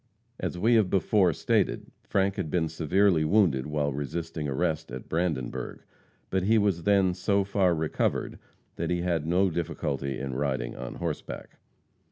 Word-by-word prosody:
As - - -3
we 115 +7 +3
have 110 -5 +4
before 95 -1 +3
stated, - - 0
Frank 100 0 0
had 90 -6 -2
been 80 -1 0
severely 85 +2 +2
wounded 75 -7 +3
while 75 -1 -1
resisting 75 +2 -4
arrest 80 +4 -1
at 65 +1 -7
Brandenburg; 80 -7 -2 0.5
but 95 - +1
he 110 +5 +3
was 100 -5 +1
then 100 -3 +4
so 100 +2 +1
far 95 -3 +2
recovered 80 -1 -1 0.4
that - - -2
he 90 -1 0
had 85 -4 0
no 90 +2 +3
difficulty 75 -5 -2
in 65 0 -4
riding 65 -3 -2
on - - -6
horseback. - - -5
85 Hz, 155 wpm, -28 LUFS, 75-95 Hz, 0.5 s, have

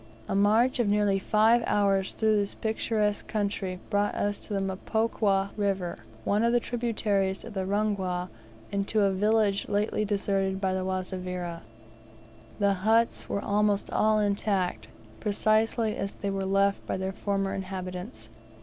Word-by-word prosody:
A - - -2
march 215 +6 +3
of 235 - +2
nearly 205 -1 +2
five 220 +4 +4
hours 195 -2 +2
through 220 -1 +2
this 205 -1 -1
picturesque 220 -1 -1
country 200 -3 -2
brought 205 0 +1
us 205 0 -1
to - - -11
the 200 - 0
Mpokwa 195 0 0
River, 195 -4 -1 0.2
one 205 - +1
of 235 - +3
the 240 - +4
tributaries 210 -5 -1
of 230 - -8
the 190 -2 -2
Rungwa, 190 -3 -1 0.4
and 200 0 -1
to 215 - +1
a 200 -1 +3
village 205 +1 +1
lately 210 +1 0
deserted 195 -2 0
by 190 -1 0
the 190 0 -1
Wazavira. 180 -2 -4 1.0
The 200 -1 +3
huts 225 +3 +2
were 200 - -1
almost 205 0 +1
all 215 0 +3
intact, 200 - 0 0.3
precisely 215 +1 +1
as 195 0 -3
they 200 0 -3
were 195 0 -2
left 195 +1 +2
by - - -1
their 190 +1 -3
former 195 -1 -1
inhabitants. 185 - -6
200 Hz, 150 wpm, -28 LUFS, 190-215 Hz, 1.0 s, five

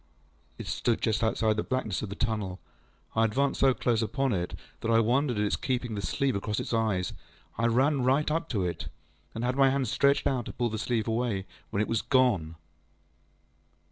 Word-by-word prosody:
ŌĆÖ - - -36
It - - -7
stood 120 -2 0
just 110 0 0
outside 110 -1 +1
the - - +2
blackness 110 -8 -2
of 105 - -4
the 100 - -5
tunnel. 105 -5 -2 0.6
I 110 - +4
advanced 135 +5 +1
so 135 -2 +4
close 120 -2 +1
upon 135 +3 0
it 90 -2 -2 0.2
that 115 - -3
I 115 0 +5
wondered 125 +2 +2
at 105 - +1
its 105 - +1
keeping 125 -3 -2
the 100 - -3
sleeve 135 +3 0
across 100 +1 -2
its - - -4
eyes. 110 -5 0 0.4
I 115 +2 +1
ran 135 +4 +3
right 135 +4 +2
up 165 +2 0
at 105 -6 0
it, 90 -1 -3 0.5
and 115 - -3
had 125 +1 0
my 135 -1 +6
hand 135 -1 0
stretched 140 +5 +2
out 125 -3 0
to - - -6
pull 120 -1 0
the 110 - -3
sleeve 115 -1 -1
away, 110 -4 -1 0.2
when 100 - 0
it - - -4
was 115 -2 0
gone. 105 -12 +2
115 Hz, 205 wpm, -28 LUFS, 105-130 Hz, 0.6 s, my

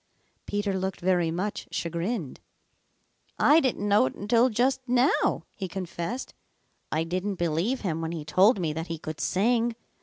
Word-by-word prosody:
Peter 205 -1 -1
looked 190 0 -3
very 175 -2 +2
much 185 +5 -3
chagrined. 170 - -3 1.0
"I 305 +2 +6
didn't 250 -8 0
know 200 -9 +4
it - - -6
until 230 +5 +3
just 255 +4 +1
how," 250 +3 +2
he 190 - -4
confessed. 185 +5 -5 0.6
"I 155 +1 +1
didn't 185 +4 -2
believe 175 +9 0
him 165 -5 -2
when 165 0 -3
he 160 -3 -5
told 190 +9 +4
me 160 -4 -1
that 160 +2 -4
he 165 - -4
could 155 0 -7
sing. 230 +4 +1
190 Hz, 155 wpm, -27 LUFS, 165-230 Hz, 1.0 s, I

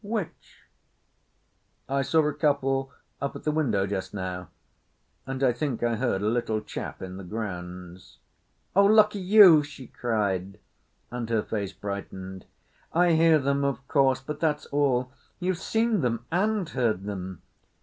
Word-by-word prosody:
"Which?" 210 -4 -5 1.3
"I 140 +1 0
saw 155 +3 +2
a 150 - -1
couple 135 -3 0 0.3
up 140 - -3
at - - -8
the 155 - +1
window 120 -11 +1
just 100 0 -4
now, 90 -2 -5 0.8
and 135 0 -3
I 125 -2 +4
think 125 -1 -3
I 120 -1 +1
heard 110 -4 -1
a - - +1
little 110 -1 0
chap 105 - -7
in 95 0 -7
the 100 - -8
grounds." 90 -3 -7 0.6
"Oh, 200 +1 +6
lucky 210 0 +5
you!" 185 -4 +8
she 145 -3 -10
cried, 100 -6 -2 0.5
and 120 -2 -4
her 110 -2 +1
face 100 -3 -3
brightened. 95 -2 -7 0.5
"I 175 +1 +3
hear 160 0 +5
them, 140 0 0
of 135 -1 -2
course, 135 -3 +3
but 150 +3 -6
that's 150 -2 0
all. 130 -3 +1 0.3
You've 180 -1 -1
seen 225 0 +1
them 115 -2 -1
and 200 +1 +1
heard 115 - 0
them?" 95 -3 -6
130 Hz, 150 wpm, -26 LUFS, 100-155 Hz, 1.3 s, you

